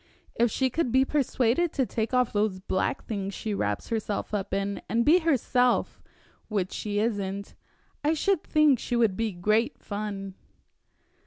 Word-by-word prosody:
If 235 +1 +2
she 260 +3 0
could 285 -4 0
be 260 +2 +4
persuaded 270 +2 +1
to 265 - +1
take 225 -1 -2
off 250 -2 +2
those 205 -2 0
black 185 0 -2
things 200 -3 -4
she 215 - -3
wraps 105 - -2
herself 215 -2 -2
up 200 -2 -2
in, 200 0 -2
and 235 +1 +1
be 325 +5 +6
herself 250 -6 +1 0.5
which 200 -4 -1
she 205 -1 -3
isn't 200 -3 -2 0.5
I 305 +2 +2
should 385 +2 +1
think 300 -5 +4
she 245 - -2
would 225 -5 +3
be 225 0 -1
great 215 +6 +1
fun." 200 -2 -5
225 Hz, 160 wpm, -27 LUFS, 200-260 Hz, 0.5 s, be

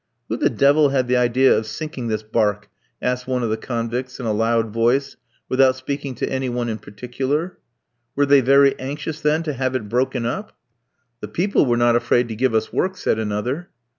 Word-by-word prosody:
"Who - - -1
the - - +2
devil 145 +1 +4
had 130 -2 0
the 125 0 +2
idea 125 +2 +4
of 110 - -2
sinking 130 +1 -5
this 110 -1 -2
barque?" 105 -2 0 0.3
asked 125 0 -1
one 125 -1 -1
of 115 - -1
the - - +1
convicts 120 +3 -4
in 125 - -5
a 110 - 0
loud 115 +1 +1
voice, 125 +5 +1 0.3
without 130 0 +3
speaking 140 0 -5
to - - -2
any 130 -1 -2
one 120 -1 -2
in 110 -1 -4
particular. 130 - -4 0.6
"Were 145 - +3
they 140 -1 +5
very 140 +2 +5
anxious, 150 +4 -5
then, 150 +2 +1
to 155 -2 -3
have 130 0 -2
it 110 -5 -3
broken 125 +1 0
up?" 195 - -4 0.6
"The - - -6
people 180 -4 +1
were 120 -1 +2
not 120 0 +3
afraid 120 0 +2
to 110 - -4
give 125 0 +1
us 110 - -1
work," 190 0 0
said 110 - 0
another. 110 +10 -3
125 Hz, 200 wpm, -21 LUFS, 115-140 Hz, 0.6 s, they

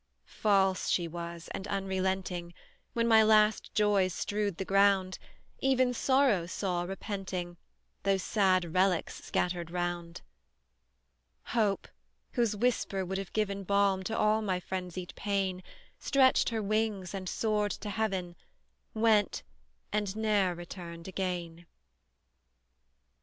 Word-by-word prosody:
False 195 -3 +1
she 175 -2 +1
was, 170 0 -7
and 195 - -5
unrelenting; 190 -3 -2 0.4
When 230 0 +1
my 220 -1 +7
last 215 0 +4
joys 200 -4 +3
strewed 205 -3 -2
the 190 - -3
ground, 195 -1 +3 0.4
Even 260 -2 +2
Sorrow 255 -9 +2
saw, 180 -1 -2
repenting, 185 -1 -5 0.4
Those 195 -1 +1
sad 185 -5 +2
relics 185 -2 +1
scattered 175 -2 -1
round; 175 -1 -3 1.3
Hope, 210 -4 +1 0.4
whose 235 -4 +1
whisper 205 -4 0
would 190 +2 -3
have 195 - -6
given 200 -2 -1
Balm 200 0 +2
to 225 - -2
all 215 +1 +3
my 190 -4 -1
frenzied 180 -1 -5
pain, 195 -2 -1 0.4
Stretched 265 -1 +4
her 225 -2 -2
wings, 210 -3 -1
and 190 -2 -4
soared 210 -2 0
to 210 - -6
heaven, 195 -5 -2 0.6
Went, 220 -2 +2 0.5
and 205 -2 -1
ne'er 210 -5 +1
returned 170 -1 -8
again! 175 -3 -4
195 Hz, 115 wpm, -30 LUFS, 180-210 Hz, 1.3 s, my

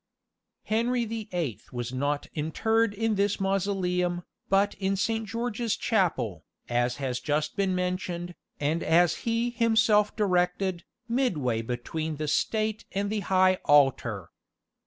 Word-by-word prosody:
Henry 235 +2 +1
the 220 -1 -5
Eighth 165 - -3
was 120 0 -4
not 145 +2 -1
interred 220 +8 +1
in 225 +1 0
this 200 0 +1
mausoleum, 180 -2 0 0.3
but 195 +1 +3
in 195 0 0
Saint 225 +3 -1
George's 230 0 -2
Chapel, 165 - 0 0.2
as 120 0 +1
has 130 -2 -2
just 150 0 -1
been 195 -2 +1
mentioned, 180 -1 -2 0.3
and 155 +3 0
as 170 +1 +3
he 230 +1 +1
himself 220 -3 +3
directed, 180 -2 +1 0.2
"midway 160 - 0
between 140 +7 -3
the 155 +1 -3
state 215 +6 0
and 200 +1 -1
the 215 - 0
high 185 -1 +3
altar." 130 - +3
185 Hz, 130 wpm, -27 LUFS, 150-215 Hz, 0.3 s, but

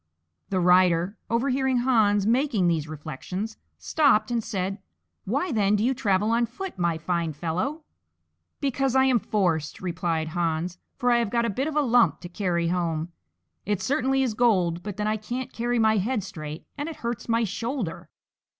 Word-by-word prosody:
The 190 - 0
Rider, 180 +1 +4
overhearing 260 +2 +1
Hans 220 -5 +3
making 230 -5 +2
these 160 -3 0
reflections, 180 +8 -6 0.2
stopped 250 -8 +2
and 235 -2 0
said, 195 -2 -3 0.5
"Why, 280 - -1
then, 210 -3 +2
do 210 - +1
you 255 +3 +2
travel 210 -4 +1
on 235 +1 +2
foot, 350 - -7
my 170 -2 +1
fine 165 0 -1
fellow?" 180 - -3 0.8
"Because 270 -2 0
I 265 - +6
am 255 -3 +4
forced," 170 -8 0
replied 170 -3 -2
Hans, 170 +1 -2 0.2
"for 245 0 +1
I 240 - +5
have 230 -3 0
got 235 +1 +1
a 230 - 0
bit 265 +8 -1
of 315 - -4
a 300 - +4
lump 235 - +3
to 175 - -8
carry 175 -3 0
home; 170 -2 -1 0.5
it 205 -1 -1
certainly 270 -1 +1
is 245 -4 0
gold, 185 -8 +2
but 205 +1 -6
then 210 - -1
I 215 +1 +1
can't 240 +4 -5
carry 240 +1 -1
my 220 -1 +4
head 215 +2 0
straight, 155 -4 -7
and 290 +3 -2
it 325 - -7
hurts 235 0 -3
my 230 0 +3
shoulder." 225 - -3
210 Hz, 175 wpm, -26 LUFS, 175-245 Hz, 0.8 s, I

